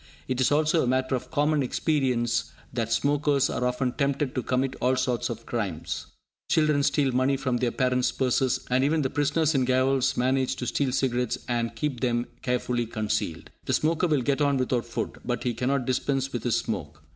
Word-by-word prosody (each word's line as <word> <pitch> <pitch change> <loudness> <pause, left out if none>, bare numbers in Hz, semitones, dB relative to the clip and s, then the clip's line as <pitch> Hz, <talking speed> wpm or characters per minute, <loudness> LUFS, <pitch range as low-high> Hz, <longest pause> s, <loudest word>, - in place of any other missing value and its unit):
It 130 0 -1
is 130 - +3
also 155 +2 +3
a - - 0
matter 130 +1 +1
of 125 - -2
common 150 0 +2
experience 130 -4 0 0.3
that 115 -2 -2
smokers 145 +2 +2
are - - -2
often 125 0 0
tempted 140 0 -1
to 130 - -1
commit 130 +2 -1
all 130 +1 +3
sorts 130 -2 0
of 115 -1 -6
crimes. 85 -9 -3 0.4
Children 155 -2 +3
steal 140 -1 +2
money 130 +2 +2
from 130 -2 -1
their 120 0 +1
parents' 125 0 +1
purses; 130 -1 0
and 130 +1 +3
even 155 +2 +2
the 130 - -1
prisoners 145 +2 +1
in 135 -2 +2
gaols 130 +1 +2
manage 130 +1 +1
to 125 - -5
steal 135 +2 0
cigarettes 125 -2 0
and 120 -1 -1
keep 145 -5 -2
them 120 -1 0 0.2
carefully 125 -1 -1
concealed. 105 -7 -3
The - - -1
smoker 165 +3 +2
will 150 -5 +1
get 140 +3 0
on 140 -1 +3
without 125 -2 0
food, 120 - -4
but 120 0 -2
he 125 - 0
cannot 130 +3 0
dispense 135 +1 -1
with 120 -1 -4
his 120 - +2
smoke! 75 -8 -4
130 Hz, 190 wpm, -26 LUFS, 120-140 Hz, 0.4 s, is